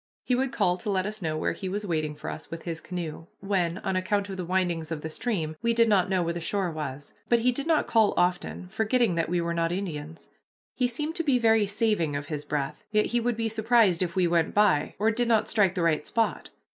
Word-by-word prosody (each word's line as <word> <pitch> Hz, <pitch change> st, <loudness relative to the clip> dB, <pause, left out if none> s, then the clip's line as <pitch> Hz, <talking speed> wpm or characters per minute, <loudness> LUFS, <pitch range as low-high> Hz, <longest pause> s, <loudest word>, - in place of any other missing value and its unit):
He 250 Hz, -, 0 dB
would 260 Hz, +1 st, +1 dB
call 180 Hz, -4 st, +1 dB
to 195 Hz, -, -5 dB
let 190 Hz, -2 st, +1 dB
us 215 Hz, 0 st, -5 dB
know 155 Hz, -2 st, -1 dB
where -, -, 0 dB
he 190 Hz, -, -5 dB
was 205 Hz, +2 st, -3 dB
waiting 155 Hz, -4 st, -1 dB
for 150 Hz, -, -6 dB
us 155 Hz, -, -9 dB
with 165 Hz, 0 st, -7 dB
his 165 Hz, -2 st, -5 dB
canoe, 165 Hz, -3 st, -6 dB
when, 185 Hz, -3 st, 0 dB
on 190 Hz, -, -1 dB
account 200 Hz, +2 st, 0 dB
of 190 Hz, -, -5 dB
the 185 Hz, -, -3 dB
windings 175 Hz, -3 st, -1 dB
of 155 Hz, -2 st, -3 dB
the 160 Hz, -, -5 dB
stream, 165 Hz, -8 st, -2 dB
we 235 Hz, 0 st, +1 dB
did 230 Hz, 0 st, +5 dB
not 195 Hz, -4 st, +3 dB
know 185 Hz, -2 st, +2 dB
where 170 Hz, 0 st, -1 dB
the 170 Hz, -, -4 dB
shore 190 Hz, +1 st, -1 dB
was, 145 Hz, -2 st, -6 dB, 0.2 s
but 235 Hz, -1 st, +4 dB
he 250 Hz, +2 st, +3 dB
did 280 Hz, +5 st, -4 dB
not 320 Hz, -2 st, +3 dB
call 220 Hz, -3 st, +3 dB
often 180 Hz, 0 st, 0 dB
enough, 185 Hz, +2 st, -13 dB
forgetting 220 Hz, -1 st, +2 dB
that 165 Hz, -1 st, -1 dB
we 175 Hz, 0 st, +1 dB
were 170 Hz, 0 st, -1 dB
not 165 Hz, 0 st, 0 dB
Indians. 165 Hz, -4 st, -5 dB, 0.4 s
He 250 Hz, -, +1 dB
seemed 300 Hz, +6 st, -3 dB
to 335 Hz, -, 0 dB
be 280 Hz, -5 st, +3 dB
very 225 Hz, -3 st, +3 dB
saving 200 Hz, -7 st, 0 dB
of 145 Hz, 0 st, -4 dB
his 150 Hz, -2 st, -4 dB
breath 140 Hz, -2 st, -3 dB
yet 215 Hz, -1 st, +2 dB
he 240 Hz, -, +3 dB
would 240 Hz, -1 st, -1 dB
be 230 Hz, -1 st, 0 dB
surprised 220 Hz, -4 st, +3 dB
if 180 Hz, -1 st, -1 dB
we 185 Hz, -1 st, +3 dB
went 170 Hz, -1 st, +1 dB
by, 200 Hz, -8 st, +3 dB
or 220 Hz, +3 st, +2 dB
did 240 Hz, +2 st, 0 dB
not 225 Hz, -2 st, +3 dB
strike 200 Hz, -4 st, +2 dB
the 180 Hz, -, 0 dB
right 160 Hz, -3 st, +2 dB
spot. 230 Hz, -1 st, -1 dB
185 Hz, 255 wpm, -27 LUFS, 165-225 Hz, 0.4 s, did